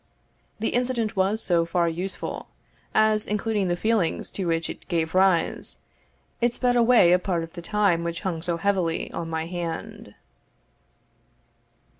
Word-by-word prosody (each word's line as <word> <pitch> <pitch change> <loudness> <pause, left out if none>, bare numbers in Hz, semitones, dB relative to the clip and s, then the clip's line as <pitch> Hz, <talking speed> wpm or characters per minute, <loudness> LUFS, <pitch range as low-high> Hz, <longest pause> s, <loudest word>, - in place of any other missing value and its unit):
The 225 - 0
incident 240 -3 0
was 200 +4 +1
so 170 -2 +2
far 170 0 +1
useful, 180 +4 -4 0.4
as, 215 0 +3
including 210 -1 0
the 175 - +1
feelings 215 -5 0
to 190 -3 -3
which 165 0 0
it - - -9
gave 165 -3 -1
rise, 185 -2 +2 0.6
it 240 0 +2
sped 245 -1 +1
away 235 -7 +6
a 180 - +5
part 180 -3 -1
of 165 - -9
the 175 - -7
time 185 -2 +1
which 170 0 -3
hung 175 -5 -3
so 170 0 -1
heavily 180 -3 0
on 165 -1 -4
my 160 0 -2
hand. 170 -1 -6
185 Hz, 150 wpm, -25 LUFS, 170-215 Hz, 0.6 s, away